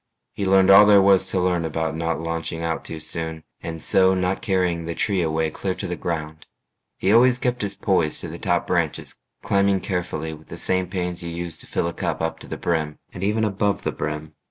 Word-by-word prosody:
He 100 - -2
learned 95 0 +5
all 105 +2 +9
there 105 -1 +7
was 95 -1 +4
To 95 - 0
learn 90 -2 +1
about 80 0 -2
not 80 0 -1
launching 80 0 -3
out 80 -1 -2
too 80 - -6
soon 80 0 -3 0.2
And 80 -1 -5
so 95 +4 +4
not 90 +1 -1
carrying 90 -4 0
the 85 0 -4
tree 100 -4 +1
away 80 -1 0
Clear 95 +3 -3
to - - -6
the 90 - -3
ground. 80 -2 -5 0.5
He 95 - +2
always 125 +2 +6
kept 125 -1 -1
his 100 -1 -2
poise 90 -6 +1
To - - -5
the - - -8
top - - 0
branches, - - -1 0.3
climbing 100 -1 +2
carefully 85 -4 -3
With 80 0 -13
the - - -8
same 95 0 +1
pains 90 -1 -3
you 85 - -5
use 85 -1 -5
to - - -11
fill - - -1
a 85 - -3
cup - - -2
Up 80 0 -2
to - - -11
the - - -5
brim, 80 -3 -1 0.2
and 90 - -6
even 105 +2 +1
above 100 0 0
the - - -1
brim. 75 0 -5
90 Hz, 225 wpm, -23 LUFS, 80-95 Hz, 0.5 s, all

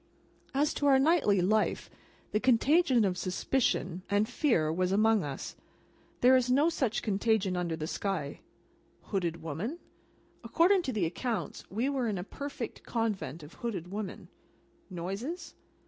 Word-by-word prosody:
As 290 +2 +2
to 285 - 0
our 270 -1 +6
nightly 270 - +3
life, 215 +4 +1 0.4
the 210 - +1
contagion 255 +1 +4
of 180 -2 -1
suspicion 185 -2 0
and 205 +2 +2
fear 165 - +1
was 185 +2 0
among 215 0 +3
us, 140 -2 -5
and - - -33
there 255 +1 +7
is 250 -1 +2
no 285 +6 +4
such 260 -9 -1
contagion 205 -2 +1
under 175 -2 -1
the 155 -1 -4
sky. 160 -4 -3 0.6
Hooded 170 -5 -2
woman? 170 - -4 0.7
According 365 +3 +4
to 270 - -3
the 210 -7 0
accounts, 225 +7 -3
we 225 +7 -1
were 270 -4 0
in 210 -3 -1
a 180 - -3
perfect 280 +2 -6
Convent 200 - -3
of 150 - -12
hooded 185 -7 -4
women. 205 -1 -6 0.6
Noises? 200 - -5
215 Hz, 145 wpm, -30 LUFS, 180-260 Hz, 0.7 s, there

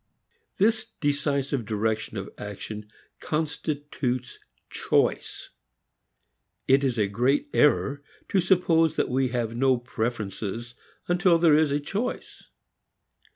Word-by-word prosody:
This 220 +2 +1
decisive 140 -3 0
direction 110 0 -2
of 100 0 -6
action 105 +1 -7 0.3
constitutes 145 -5 -3 0.3
choice. - - 0 1.2
It 135 +1 +4
is 130 -3 0
a 105 - +3
great 125 - +1
error 145 -1 +3 0.3
to 190 - +3
suppose 170 -3 +3
that - - 0
we 130 +1 +1
have 120 -2 -2
no 130 +1 +3
preferences 115 -1 -4 0.3
until 175 -1 +4
there 165 -3 +5
is 155 -1 +4
a 145 +1 +1
choice. 200 +11 -5
135 Hz, 110 wpm, -26 LUFS, 115-160 Hz, 1.2 s, there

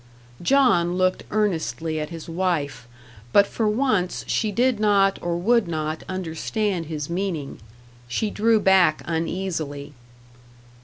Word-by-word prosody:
John 180 -7 +3
looked 185 0 +1
earnestly 160 - -1
at 150 - -4
his 165 -2 -8
wife, 165 -8 -2 0.4
but 200 - +6
for 220 +2 -2
once 210 -5 0
she 215 -2 0
did 245 +2 +1
not 200 -2 +3
or 170 0 -1
would 230 +3 +2
not 155 -1 -3
understand 185 +1 -2
his 150 -2 -4
meaning; 170 -5 -3 0.5
she 205 - -1
drew 220 +1 +3
back 190 -5 +4
uneasily. 160 -4 -3
180 Hz, 120 wpm, -23 LUFS, 160-210 Hz, 0.5 s, but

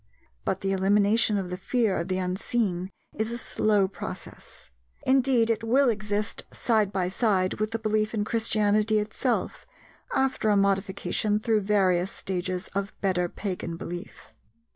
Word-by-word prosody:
But 190 0 -1
the 195 - 0
elimination 205 +3 +3
of 185 -2 -3
the 180 - -3
fear 225 0 +1
of 170 - -3
the 185 -1 -1
unseen 185 0 -1 0.2
is 220 +1 -2
a 235 - -3
slow 210 -4 +1
process; 190 - -9 0.3
indeed, 255 -3 +3
it 225 0 -2
will 255 +4 +4
exist 210 0 -2
side 215 -4 +1
by 185 -2 0
side 190 -2 +1
with 215 0 0
the 225 - -2
belief 215 -1 0
in 210 -1 0
Christianity 215 -1 +2
itself, 220 - -1 0.5
after 265 -5 +1
a 205 - +4
modification 200 +1 +1
through 220 -1 +1
various 190 -3 +2
stages 185 -1 -3
of 200 +1 -4
better 180 -3 +1
pagan 180 -4 -4
belief. 175 +3 -8
205 Hz, 145 wpm, -27 LUFS, 190-220 Hz, 0.5 s, will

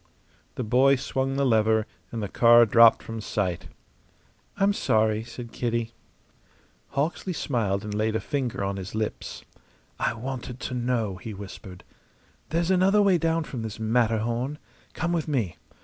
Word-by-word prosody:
The 125 - -3
boy 130 +5 +4
swung 135 +1 -2
the 140 0 +1
lever, 110 -2 +3 0.3
and 115 -2 -4
the - - -2
car 120 +3 +6
dropped 115 +1 +6
from 115 -1 -6
sight. 95 -5 -2 0.9
"I'm 200 0 +3
sorry," 110 - +1
said 120 0 -9
Kitty. 115 -1 -2 1.1
Hawksley 165 +5 -1
smiled 110 - -1
and 105 -1 -5
laid 110 +1 0
a - - +1
finger 125 -2 -2
on 100 0 -2
his 95 +2 -6
lips. 110 -1 -4 0.6
"I 115 - 0
wanted 125 +1 -6
to - - -4
know," 120 -6 -1
he 105 +3 -7
whispered. 95 -2 -10 0.7
"There's 170 +2 0
another 190 +3 +4
way 190 -3 +4
down 165 0 +1
from 130 -5 -6
this 110 -1 -6
Matterhorn. 115 +4 0 0.4
Come 170 +1 -1
with 165 -2 -1
me. 120 - -1
115 Hz, 150 wpm, -26 LUFS, 110-135 Hz, 1.1 s, car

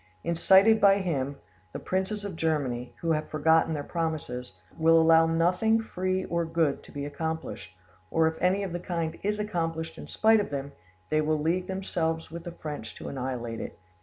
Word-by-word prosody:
Incited 190 +6 +5
by 195 -1 +6
him, 145 -8 -2 0.4
the - - -3
princes 190 +3 -2
of 195 -4 -5
Germany, 140 -7 -1
who 165 - 0
have 155 -1 -1
forgotten 160 +1 +3
their 145 - -3
promises, 150 -7 -3 0.2
will 165 0 +5
allow 165 0 +6
nothing 180 +7 +2
free 185 -3 -2
or 170 0 0
good 165 -3 0
to - - -15
be 145 0 -5
accomplished; 145 - -5 0.3
or 160 +6 +3
if 160 0 -3
anything 190 +2 +2
of 190 -3 -4
the 175 - -2
kind 165 -2 -3
is 210 +1 0
accomplished 165 -6 -3
in - - -8
spite 220 0 +4
of 205 - -2
them, 140 0 -4 0.4
they 155 0 +3
will 155 0 +1
league 175 +4 0
themselves 165 -4 -2
with 170 +1 -7
the 175 - -5
French 150 -3 -7
to - - -7
annihilate 125 -4 -4
it. - - -7
165 Hz, 185 wpm, -28 LUFS, 155-185 Hz, 0.4 s, by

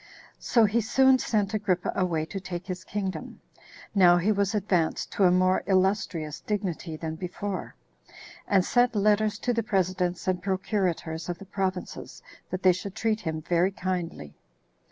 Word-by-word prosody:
So 230 -3 +3
he 220 +3 +2
soon 265 +4 +4
sent 210 -4 0
Agrippa 195 -4 0
away 170 -5 0
to 195 +4 -6
take 180 -2 -6
his 185 -1 -5
kingdom, 195 -2 -5 0.5
now 180 -3 +6
he 185 +5 +2
was 200 0 +1
advanced 180 -6 0
to 195 - +2
a 180 - +6
more 185 +1 +3
illustrious 185 -5 0
dignity 185 -6 -3
than 160 0 -4
before, 185 +2 -5 0.7
and 190 -3 +3
sent 245 -1 +2
letters 210 +1 +2
to 245 - -1
the 230 - +1
presidents 185 -4 -1
and 180 -1 0
procurators 180 -4 -2
of 175 - -3
the 195 - -11
provinces 190 -1 -4 0.3
that 185 +1 -4
they 185 -1 +6
should 190 +2 -6
treat 220 -1 0
him 160 -1 -4
very 175 +3 +2
kindly. 180 - -4
190 Hz, 155 wpm, -27 LUFS, 175-205 Hz, 0.7 s, now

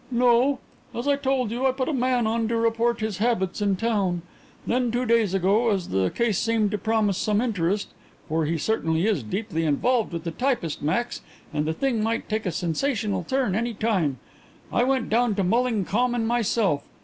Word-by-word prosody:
"No. 250 +2 +3 0.4
As 240 +4 -3
I 285 - +4
told 265 -4 0
you, 250 +3 +1
I - - +3
put 260 0 -2
a 320 - -1
man 250 -2 +1
on 225 +1 0
to 230 - -1
report 230 0 +1
his 215 -3 -2
habits 210 -4 0
in 200 -1 +2
town. 190 -5 0 0.4
Then, 245 0 +1
two 245 +2 -1
days 225 -5 +2
ago, 200 +5 +2
as 195 -4 -1
the 95 -1 +1
case 230 -5 0
seemed 225 -2 +1
to 210 - -2
promise 220 -3 +1
some 210 -1 +1
interest 200 -4 0 0.4
for 160 0 0
he 165 +2 0
certainly 165 -2 0
is 210 -9 +1
deeply 165 - -3
involved 220 - +1
with 170 -2 -4
the 170 - -3
typist, 245 - -1
Max, 235 +11 -1 0.3
and 150 - 0
the 160 - 0
thing 245 +3 0
might 225 +1 -1
take 215 -2 -2
a - - 0
sensational 200 - -1
turn 260 0 0
any 230 +3 -1
time 190 - 0 0.6
I 240 - +3
went 265 -2 +1
down 235 -1 +2
to 195 - 0
Mulling 225 +1 +1
Common 240 +3 0
myself. 225 -8 +1
220 Hz, 195 wpm, -25 LUFS, 190-240 Hz, 0.6 s, I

